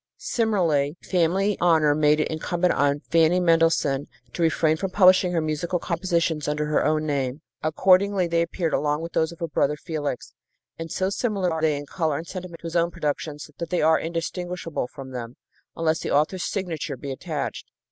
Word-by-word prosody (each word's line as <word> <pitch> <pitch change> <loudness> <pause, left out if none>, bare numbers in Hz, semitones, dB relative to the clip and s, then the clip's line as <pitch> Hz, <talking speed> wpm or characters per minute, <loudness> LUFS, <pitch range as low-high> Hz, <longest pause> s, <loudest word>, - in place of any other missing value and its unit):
Similarly, 175 - 0
family 190 +3 +1
honor 160 -4 +4
made 150 0 +3
it 155 - +1
incumbent 175 +3 0
on 145 0 +1
Fanny 165 +2 +4
Mendelssohn 165 -5 +2 0.3
to - - -4
refrain 160 -1 +3
from 190 +4 -3
publishing 185 -1 +5
her 170 -2 +1
musical 155 +3 -1
compositions 170 -3 -1
under 150 0 -1
her 150 0 +1
own 155 0 +1
name. 140 -1 -2 0.2
Accordingly, 185 +4 +3
they 170 0 +1
appeared 170 -1 -2
along 150 +2 0
with 165 - -7
those 160 0 +1
of 170 - -11
her 170 - -1
brother 150 -1 +1
Felix, 150 -4 -4 0.5
and 165 -1 -6
so 190 +1 -1
similar 200 -5 0
are 160 - -3
they 155 -2 +2
in 145 - -6
color 155 -1 -1
and 160 - -6
sentiment 180 -2 -8
to - - -11
his 165 +1 -5
own 170 0 +3
productions 150 -1 -4
that 170 - -4
they 180 - 0
are 160 0 +4
indistinguishable 170 -2 -4
from 130 +1 -10
them, 120 -1 -6 0.4
unless 160 -1 +1
the - - -4
author's 155 +5 +1
signature 165 -8 -3
be 140 +2 -6
attached. 145 -4 -5
165 Hz, 185 wpm, -24 LUFS, 150-175 Hz, 0.5 s, publishing